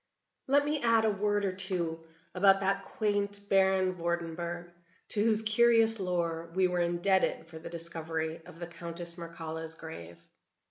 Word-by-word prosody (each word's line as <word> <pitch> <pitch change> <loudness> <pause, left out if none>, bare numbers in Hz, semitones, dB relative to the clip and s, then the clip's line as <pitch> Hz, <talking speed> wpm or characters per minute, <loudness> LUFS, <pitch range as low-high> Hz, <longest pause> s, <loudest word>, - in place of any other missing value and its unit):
Let 285 +2 +4
me 295 -1 -1
add 230 -1 +4
a 215 - +3
word 205 0 0
or 190 - 0
two 180 -4 -2 0.3
about 195 +1 +5
that 195 0 +1
quaint 205 -1 -2
Baron 190 -1 +3
Vordenburg, 170 0 -3 0.4
to 210 - +3
whose 220 -1 +3
curious 225 0 +4
lore 170 -3 -2
we 190 -1 +4
were 180 0 -1
indebted 175 +2 +1
for 160 -1 -10
the 160 - -8
discovery 165 -1 -4
of - - -12
the 170 - -5
Countess 170 0 -7
Mircalla's 165 -1 -7
grave. 85 - -9
180 Hz, 150 wpm, -30 LUFS, 170-205 Hz, 0.4 s, about